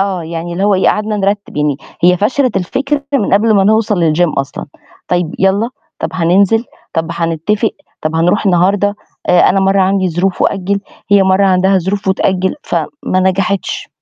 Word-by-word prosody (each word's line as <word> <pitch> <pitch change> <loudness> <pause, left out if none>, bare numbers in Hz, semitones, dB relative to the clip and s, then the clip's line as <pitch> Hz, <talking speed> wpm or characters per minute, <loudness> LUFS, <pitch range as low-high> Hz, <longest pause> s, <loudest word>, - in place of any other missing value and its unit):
آه، 195 -3 -1
يعني 165 +1 -5
اللي 185 +3 -1
هو 205 -1 +3
إيه، 190 - +2
قعدنا 215 0 -1
نرتِّب، 200 0 -2
يعني 150 -2 0 0.3
هي 180 +1 +5
فشلت 250 +6 0
الفكرة 275 +10 -1
من 210 -8 +2
قبل 215 +2 +3
ما 195 -1 +3
نوصَل 205 -6 +2
للgym 175 0 +1
أصلًا. 135 +1 -4 0.4
طيب 175 -2 -1
يالّا، 195 +5 +1 0.3
طَب - - -2
هننزِل، 195 +6 +2 0.3
طَب 165 -1 -1
هنتتفق، 170 +6 -1 0.3
طَب 155 +1 -2
هنروح 180 +6 +1
النهارده، 195 +3 +2 0.3
آآ 180 - +5
أنا 195 - +2
مرّة 195 0 +2
عندي 190 0 +1
ظروف 180 +3 -1
وأجِّل، 200 +1 0 0.3
هي 200 -1 +6
مرّة 190 +1 +3
عندها 190 +1 +3
ظروف 190 +2 -3
وتأجِّل، 190 0 0
فما 185 -10 -2
نجحتش. 190 +1 -1
190 Hz, 165 wpm, -14 LUFS, 175-205 Hz, 0.4 s, هي